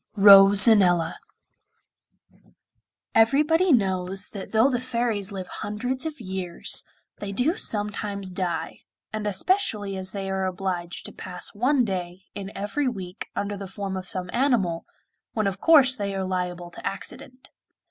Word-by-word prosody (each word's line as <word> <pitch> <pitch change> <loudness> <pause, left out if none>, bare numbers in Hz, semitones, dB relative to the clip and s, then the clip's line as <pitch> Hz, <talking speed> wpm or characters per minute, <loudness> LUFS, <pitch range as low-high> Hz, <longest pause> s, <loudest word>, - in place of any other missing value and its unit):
ROSANELLA 195 -3 +7 1.9
Everybody 300 +10 +3
knows 190 -4 +1
that 200 -2 -8
though 225 +3 +4
the 250 -3 0
fairies 235 -5 -2
live 190 -2 -6
hundreds 250 +8 -3
of 305 -2 -7
years 185 -4 -2 0.4
they 205 -1 -5
do 250 - +1
sometimes 205 - -2
die, 180 -3 -3 0.3
and 215 -1 -3
especially 205 - 0
as 190 0 -3
they 195 0 -5
are 190 0 -1
obliged 180 -2 -4
to - - -6
pass 180 -1 -6
one 250 +4 +2
day 185 -2 -5
in 200 -1 -7
every 210 +8 -2
week 190 -5 -5
under 205 0 -2
the 195 -1 -7
form 195 0 -5
of 185 0 -6
some 180 -1 -4
animal, 235 -10 +1 0.5
when 215 -2 -1
of 195 0 -2
course 280 -6 +6
they 200 -4 -3
are 190 -1 -2
liable 180 -1 -4
to - - -11
accident. 255 +6 -7
200 Hz, 140 wpm, -25 LUFS, 185-235 Hz, 1.9 s, ROSANELLA